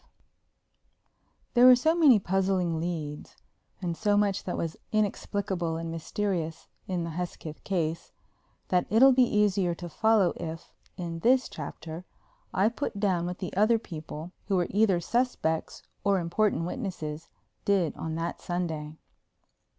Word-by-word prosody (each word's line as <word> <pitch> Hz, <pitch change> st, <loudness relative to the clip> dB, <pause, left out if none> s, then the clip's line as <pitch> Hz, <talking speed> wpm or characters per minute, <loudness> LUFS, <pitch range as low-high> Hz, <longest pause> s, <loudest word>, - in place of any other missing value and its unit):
V -, -, -42 dB, 0.3 s
There 245 Hz, 0 st, +7 dB
were 255 Hz, -, +10 dB
so 315 Hz, +6 st, +2 dB
many 305 Hz, -9 st, +6 dB
puzzling 185 Hz, -3 st, 0 dB
"leads" 160 Hz, -3 st, -5 dB, 0.5 s
and 170 Hz, -2 st, -1 dB
so 205 Hz, +2 st, +2 dB
much 205 Hz, -2 st, +1 dB
that 180 Hz, -, -3 dB
was 165 Hz, -1 st, -3 dB, 0.2 s
inexplicable 195 Hz, -5 st, -1 dB
and 165 Hz, 0 st, -4 dB
mysterious 165 Hz, -1 st, -3 dB, 0.2 s
in 180 Hz, -2 st, -1 dB
the 165 Hz, -, -4 dB
Hesketh 165 Hz, -2 st, -6 dB
case 165 Hz, -4 st, -2 dB, 0.6 s
that 180 Hz, -1 st, +2 dB
it'll 255 Hz, +5 st, +7 dB
be 260 Hz, 0 st, +4 dB, 0.2 s
easier 195 Hz, -4 st, +2 dB
to 175 Hz, 0 st, -7 dB
follow 215 Hz, +1 st, +3 dB
if, 165 Hz, -1 st, -7 dB, 0.2 s
in 170 Hz, -2 st, -4 dB
this 255 Hz, +7 st, +3 dB
chapter, 160 Hz, +2 st, -7 dB, 0.5 s
I 195 Hz, +3 st, +3 dB
put 235 Hz, -4 st, -4 dB
down 185 Hz, -4 st, +1 dB
what 180 Hz, 0 st, -4 dB
the 185 Hz, -, -5 dB
other 215 Hz, +4 st, +4 dB
people, 160 Hz, -4 st, -8 dB, 0.2 s
who 200 Hz, -, +1 dB
were 180 Hz, -1 st, +2 dB
either 200 Hz, -3 st, +3 dB
suspects 205 Hz, -6 st, -1 dB, 0.2 s
or 200 Hz, -1 st, +3 dB
important 175 Hz, +1 st, +1 dB
witnesses, 170 Hz, -, -5 dB, 0.3 s
did 190 Hz, -6 st, +1 dB
on 160 Hz, 0 st, -4 dB
that 165 Hz, +1 st, -3 dB
Sunday. 160 Hz, -4 st, -3 dB
180 Hz, 145 wpm, -28 LUFS, 165-205 Hz, 0.6 s, were